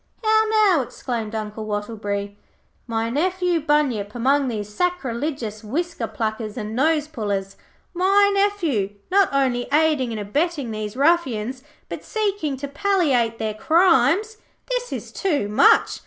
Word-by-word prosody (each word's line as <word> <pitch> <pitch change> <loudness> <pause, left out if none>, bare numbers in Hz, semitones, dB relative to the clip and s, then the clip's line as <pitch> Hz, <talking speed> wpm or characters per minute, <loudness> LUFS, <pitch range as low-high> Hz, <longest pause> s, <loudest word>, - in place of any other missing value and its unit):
'How 440 0 +4 0.2
now,' 360 -8 +4
exclaimed 230 -3 -5
Uncle 215 0 -5
Wattleberry. 205 -1 -3 0.5
'My 225 0 -1
nephew 360 +4 +1
Bunyip 270 -9 0
among 270 +3 +2
these 215 -4 -3
sacrilegious 250 -5 -3
whisker 295 +2 -3
pluckers 220 -1 -4
and 215 -1 -5
nose 300 +3 +2
pullers. 200 -9 -3 0.4
My 395 +3 +4
nephew, 340 - 0 0.2
not 395 0 +4
only 260 -3 +1
aiding 300 -4 +2
and 225 -2 -4
abetting 285 - -1
these 215 +1 -5
ruffians, 265 -6 +1 0.3
but - - -7
seeking 405 -10 -2
to 280 +2 -5
palliate 280 - +1
their 220 -1 -2
crimes! 340 - +3 0.3
This - - -2
is - - -6
too 305 - -1
much. 210 - +4
265 Hz, 130 wpm, -22 LUFS, 220-340 Hz, 0.5 s, How